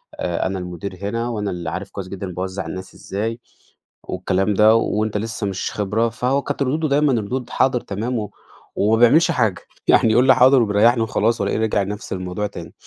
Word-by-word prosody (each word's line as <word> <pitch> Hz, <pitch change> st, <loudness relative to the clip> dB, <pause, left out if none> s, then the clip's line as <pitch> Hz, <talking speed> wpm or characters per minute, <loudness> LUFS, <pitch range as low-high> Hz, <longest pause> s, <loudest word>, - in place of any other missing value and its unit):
أ 90 Hz, +1 st, -2 dB
أنا 95 Hz, 0 st, -3 dB
المدير 90 Hz, +2 st, -6 dB
هنا، 115 Hz, +4 st, -2 dB
وأنا 105 Hz, -3 st, -2 dB
اللي 85 Hz, -1 st, -4 dB
عارف 100 Hz, +2 st, -6 dB
كويس 95 Hz, -2 st, -6 dB
جدًا 100 Hz, 0 st, -6 dB
أنا 90 Hz, -, -8 dB
باوزّع 95 Hz, +1 st, -4 dB
الناس 95 Hz, 0 st, -7 dB
إزاي، 110 Hz, +4 st, -4 dB, 0.6 s
والكلام 95 Hz, +3 st, -1 dB
ده 110 Hz, +2 st, +6 dB
وأنت 110 Hz, -1 st, 0 dB
لسّه 110 Hz, -1 st, -3 dB
مش 95 Hz, -1 st, -3 dB
خبرة. 110 Hz, +3 st, 0 dB
فهو 125 Hz, +4 st, 0 dB
كانت 145 Hz, -1 st, -2 dB
ردوده 155 Hz, +4 st, 0 dB
دايمًا، 145 Hz, -1 st, +2 dB
ردود 125 Hz, +4 st, -4 dB
حاضر، 130 Hz, -2 st, +2 dB
تمام 110 Hz, +4 st, -3 dB
و 105 Hz, -2 st, -5 dB, 0.4 s
وما 110 Hz, +2 st, +2 dB
بيعملش 150 Hz, +8 st, +5 dB
حاجة. 110 Hz, -7 st, 0 dB, 0.3 s
يعني 115 Hz, -, +5 dB
يقول 125 Hz, +3 st, +4 dB
لي 130 Hz, -, +7 dB
حاضر 130 Hz, +1 st, +6 dB
وبيريّحني 115 Hz, +2 st, +3 dB
وخلاص، 110 Hz, 0 st, 0 dB
والاقيه 100 Hz, +2 st, 0 dB
رجع 110 Hz, -2 st, +1 dB
نفس 105 Hz, +2 st, -5 dB
الموضوع 90 Hz, +2 st, -3 dB
تاني. 85 Hz, -4 st, -10 dB
105 Hz, 190 wpm, -21 LUFS, 100-120 Hz, 0.6 s, لي